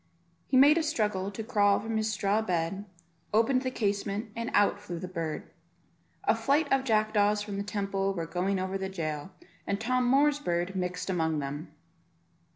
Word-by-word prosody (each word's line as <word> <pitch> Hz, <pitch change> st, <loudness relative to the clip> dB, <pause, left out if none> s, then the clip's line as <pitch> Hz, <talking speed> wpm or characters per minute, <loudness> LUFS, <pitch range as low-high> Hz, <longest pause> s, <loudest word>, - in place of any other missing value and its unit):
He 260 Hz, -, +2 dB
made 290 Hz, +5 st, +7 dB
a -, -, +1 dB
struggle 210 Hz, -10 st, -1 dB
to 205 Hz, +2 st, -6 dB
crawl 205 Hz, -3 st, +3 dB
from 225 Hz, +2 st, -4 dB
his 220 Hz, 0 st, 0 dB
straw 205 Hz, 0 st, +1 dB
bed, 185 Hz, 0 st, -2 dB, 0.5 s
opened 255 Hz, +4 st, +3 dB
the 260 Hz, -, -1 dB
casement, 205 Hz, -2 st, -2 dB
and 230 Hz, +1 st, -3 dB
out 205 Hz, 0 st, +3 dB
flew 180 Hz, -4 st, -6 dB
the 180 Hz, -, -5 dB
bird. 165 Hz, -4 st, -5 dB, 0.7 s
A -, -, +4 dB
flight 290 Hz, +3 st, +2 dB
of 270 Hz, -1 st, +3 dB
jackdaws 215 Hz, -3 st, +2 dB
from 205 Hz, -1 st, -5 dB
the 200 Hz, -, -2 dB
Temple 195 Hz, -1 st, -1 dB
were 165 Hz, -2 st, -2 dB
going 185 Hz, +4 st, -1 dB
over 190 Hz, +1 st, -2 dB
the 190 Hz, 0 st, -3 dB
jail, 155 Hz, -3 st, -4 dB, 0.4 s
and 200 Hz, 0 st, -1 dB
Tom 250 Hz, +2 st, +1 dB
Moor's 290 Hz, +2 st, +4 dB
bird 175 Hz, -5 st, -1 dB
mixed 180 Hz, -1 st, -3 dB
among 160 Hz, -3 st, 0 dB
them. 145 Hz, +3 st, -5 dB
200 Hz, 175 wpm, -29 LUFS, 185-225 Hz, 0.7 s, made